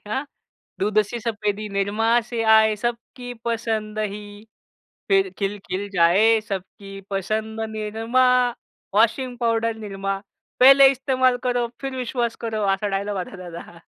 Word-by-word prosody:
हां. 265 +7 -2 0.6
दूध 210 +2 +1
सी 240 - -4
सफेदी 215 -2 -2
निरमा 200 +3 -1 0.2
से 230 -1 -1
आये, 220 -1 +5
सबकी 240 +2 -5
पसंद 220 -2 -2
ही 210 0 -3 0.9
फिर 390 -1 +3
खिलखिल 200 -1 -3
जाये, 200 +6 +4
सबकी 195 0 -7
पसंद 215 +3 -3
निरमा. 225 +4 0 0.7
Washing 245 +3 +2
powder 230 -1 0
Nirma. 195 0 -3 0.4
पहिले 270 +1 +9
इस्तेमाल 260 -1 +1
करो, 245 -1 +1
फिर 270 -1 -4
विश्वास 240 -2 -2
करो. 220 -1 -2
असा 205 +2 -2
डायलॉग 200 0 -2
होता 185 +1 -6
त्याचा. 170 -1 -10
220 Hz, 125 wpm, -23 LUFS, 200-240 Hz, 0.9 s, पहिले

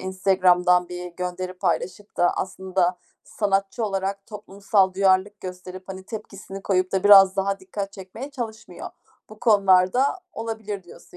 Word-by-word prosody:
Instagram'dan 180 -1 +2
bir 180 0 -6
gönderi 180 0 -4
paylaşıp 185 +4 -3
da 175 - +3
aslında 185 -1 -1 0.3
sanatçı 200 +2 -1
olarak 195 -1 -3
toplumsal 200 -2 0
duyarlılık 195 +1 +2
gösterip, 185 0 -8
hani, 190 0 -7
tepkisini 195 -2 -9
koyup 185 -1 0
da 190 0 0
biraz 195 -2 +8
daha 195 0 -1
dikkat 195 +1 -6
çekmeye 200 +8 -9
çalışmıyor. 235 -5 -7 0.4
Bu 215 - -14
konularda 200 +2 +4 0.3
olabilir 220 -3 -5
diyorsun, 175 0 -16
195 Hz, 130 wpm, -23 LUFS, 185-205 Hz, 0.4 s, biraz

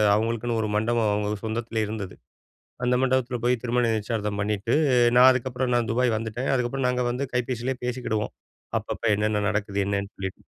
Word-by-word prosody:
அவங்களுக்குன்னு 115 +1 -1
ஒரு 110 - -1
மண்டபம் 110 0 +2
அவங்க 105 0 -1
சொந்தத்லயே 110 0 -2
இருந்தது. 105 -4 -5 0.7
அந்த 125 0 +3
மண்டபத்துல 130 -1 +1
போயி, 125 - +4
திருமண 125 0 +1
நிச்சயதார்த்தம் 105 -1 -2
பண்ணிட்டு, 105 +2 -1 0.4
நான் 130 +1 +9
அதுக்கப்றம் 125 0 -1
நான் 120 -1 +1
துபாய் 120 -1 +2
வந்துட்டேன். 115 +5 -2
அதுக்கப்றம் 125 +1 0
நாங்க 125 0 0
வந்து 130 +3 -2
கைபேசிலே 125 +1 -1
பேசிக்கிடுவோம். 120 -4 -2 0.5
அப்பப்ப - - -7
என்னன்ன 105 0 0
நடக்குது? 105 -1 -1
என்னன்னு 100 0 -2
சொல்லிட்டு. 95 -1 -6
115 Hz, 155 wpm, -25 LUFS, 105-125 Hz, 0.7 s, நான்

